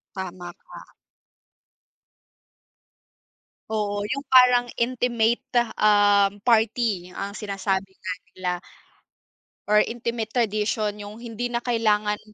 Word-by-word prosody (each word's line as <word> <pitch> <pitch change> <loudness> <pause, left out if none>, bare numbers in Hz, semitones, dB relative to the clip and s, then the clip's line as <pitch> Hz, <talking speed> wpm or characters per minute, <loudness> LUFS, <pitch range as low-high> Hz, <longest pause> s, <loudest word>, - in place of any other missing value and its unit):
Tama 180 -2 -6
ka. - - -15 2.8
Oo, 205 -1 -1
yung 275 +7 -3
parang 250 -1 +6
intimate, 235 -1 +1 0.4
um, 205 -1 +4
party 220 -5 +1
ang 200 +1 -4
sinasabi 195 -2 -3
nga 185 - -5 0.2
nila. 185 -1 -2 1.2
Or 210 0 +5
intimate 230 0 -2
tradition, 215 -2 0
yung 205 +1 -8
hindi 235 +1 -4
na 240 0 -3
kailangan, 210 -3 +1
210 Hz, 90 wpm, -24 LUFS, 200-235 Hz, 2.8 s, parang